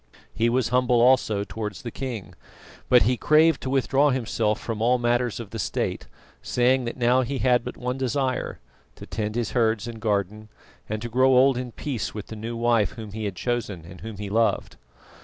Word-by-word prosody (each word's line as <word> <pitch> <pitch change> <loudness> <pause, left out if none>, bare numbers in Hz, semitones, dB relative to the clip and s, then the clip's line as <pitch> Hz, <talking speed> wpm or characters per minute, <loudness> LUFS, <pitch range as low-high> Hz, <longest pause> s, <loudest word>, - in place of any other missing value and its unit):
He 115 +1 +1
was 125 -1 +1
humble 125 -1 +3
also 120 -4 +3
towards 105 -1 -6
the 120 - -5
king, 125 -7 -6 0.6
but 125 -1 +6
he 125 +4 +2
craved 155 +2 +4
to 130 - -4
withdraw 135 +2 +3
himself 115 -4 0
from 110 -2 -4
all 125 +2 +3
matters 120 -1 0
of 115 -4 -8
the 115 - -5
State, - - -2 0.3
saying 125 +1 +2
that 120 - -5
now 125 +1 +3
he 130 +2 -3
had 125 -2 +2
but 125 - -7
one 125 +1 -3
desire 130 0 -1 0.4
to - - -10
tend 105 -1 -4
his 120 -3 -1
herds 110 -3 +1
and 115 -2 -8
garden, 105 0 -1 0.4
and 110 +1 -3
to - - -3
grow 130 +3 +3
old 135 +1 +5
in 125 0 -4
peace 115 - -4
with 105 - -7
the 110 - -6
new 115 +2 -5
wife 115 -2 +2
whom 110 -4 -8
he 110 +1 -5
had 100 -2 -3
chosen 105 -6 -3
and 85 +1 -12
whom 110 -2 -7
he 105 0 -5
loved. 115 +1 +1
120 Hz, 200 wpm, -25 LUFS, 110-125 Hz, 0.6 s, but